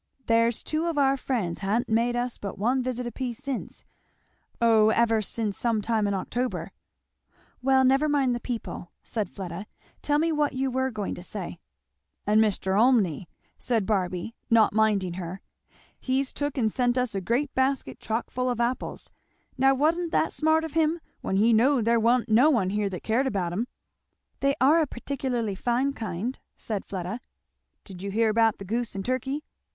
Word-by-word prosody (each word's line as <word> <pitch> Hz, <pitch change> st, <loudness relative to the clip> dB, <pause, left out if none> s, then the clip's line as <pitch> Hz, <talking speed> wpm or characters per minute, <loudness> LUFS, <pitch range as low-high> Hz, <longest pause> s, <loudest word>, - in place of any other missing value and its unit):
"There's 230 Hz, 0 st, +2 dB
two 315 Hz, +2 st, -1 dB
of 330 Hz, -3 st, -2 dB
our 275 Hz, -1 st, +4 dB
friends 230 Hz, -10 st, -2 dB
ha'n't 210 Hz, +4 st, 0 dB
made 230 Hz, +2 st, +1 dB
us 245 Hz, 0 st, -2 dB
but 200 Hz, -, -6 dB
one 245 Hz, +6 st, +1 dB
visit 250 Hz, -1 st, -3 dB
a 240 Hz, -, -4 dB
piece 245 Hz, -3 st, -4 dB
since 275 Hz, -2 st, -6 dB, 0.7 s
oh, 225 Hz, -2 st, +5 dB
ever 225 Hz, 0 st, +3 dB
since 210 Hz, -1 st, -2 dB
some 230 Hz, -2 st, +1 dB
time 215 Hz, -1 st, 0 dB
in 200 Hz, -, 0 dB
October!" 245 Hz, +6 st, -3 dB, 0.9 s
"Well 265 Hz, 0 st, +4 dB
never 270 Hz, +4 st, +3 dB
mind 275 Hz, -4 st, +2 dB
the 240 Hz, -, -2 dB
people," 230 Hz, -8 st, -5 dB
said 215 Hz, -5 st, -3 dB
Fleda. 190 Hz, +1 st, -7 dB, 0.3 s
"Tell 290 Hz, 0 st, +1 dB
me 325 Hz, +2 st, +2 dB
what 300 Hz, -2 st, +1 dB
you 265 Hz, 0 st, -1 dB
were 260 Hz, +1 st, 0 dB
going 210 Hz, -5 st, -4 dB
to -, -, -8 dB
say." 180 Hz, -2 st, -6 dB, 0.7 s
"And 215 Hz, +1 st, +4 dB
Mr. 195 Hz, -3 st, +1 dB
Olmney," 205 Hz, -, +3 dB, 0.3 s
said 230 Hz, -5 st, 0 dB
Barby 185 Hz, 0 st, -1 dB, 0.2 s
not 225 Hz, -3 st, +5 dB
minding 205 Hz, -4 st, +2 dB
her, 180 Hz, +3 st, -6 dB, 0.6 s
"he's 265 Hz, +1 st, -1 dB
took 290 Hz, -1 st, -3 dB
and 220 Hz, -4 st, +2 dB
sent 245 Hz, +1 st, +1 dB
us 250 Hz, -3 st, +1 dB
a 195 Hz, -, -2 dB
great 245 Hz, +9 st, 0 dB
basket 265 Hz, +1 st, 0 dB
chock 225 Hz, +2 st, -3 dB
full 255 Hz, 0 st, -1 dB
of 245 Hz, -2 st, -2 dB
apples. 240 Hz, +2 st, -2 dB, 0.4 s
Now 270 Hz, +1 st, +4 dB
wa'n't 325 Hz, +5 st, +1 dB
that 320 Hz, -, +1 dB
smart 315 Hz, +1 st, +2 dB
of 320 Hz, -2 st, -5 dB
him, 325 Hz, +1 st, +2 dB, 0.2 s
when 190 Hz, -, -2 dB
he 220 Hz, +4 st, +4 dB
knowed 240 Hz, +1 st, +3 dB
there 235 Hz, 0 st, +3 dB
wa'n't 235 Hz, +2 st, +3 dB
no 235 Hz, +7 st, +5 dB
one 210 Hz, -10 st, +2 dB
here 205 Hz, 0 st, 0 dB
that 180 Hz, -2 st, -6 dB
cared 245 Hz, +5 st, +1 dB
about 185 Hz, -7 st, -1 dB
'em?" 225 Hz, +7 st, -1 dB, 0.7 s
"They 275 Hz, 0 st, +2 dB
are 300 Hz, +5 st, +5 dB
a 310 Hz, -, +1 dB
particularly 245 Hz, -4 st, -3 dB
fine 245 Hz, +7 st, 0 dB
kind," 225 Hz, +1 st, -4 dB, 0.2 s
said 210 Hz, -3 st, -4 dB
Fleda. 190 Hz, +4 st, -4 dB, 0.6 s
"Did 185 Hz, -3 st, -10 dB
you 200 Hz, -, -4 dB
hear 220 Hz, +3 st, +2 dB
about 225 Hz, 0 st, +3 dB
the 195 Hz, -, -8 dB
goose 230 Hz, +2 st, -2 dB
and 195 Hz, -, -4 dB
turkey?" 265 Hz, +4 st, -2 dB
235 Hz, 180 wpm, -26 LUFS, 210-265 Hz, 0.9 s, oh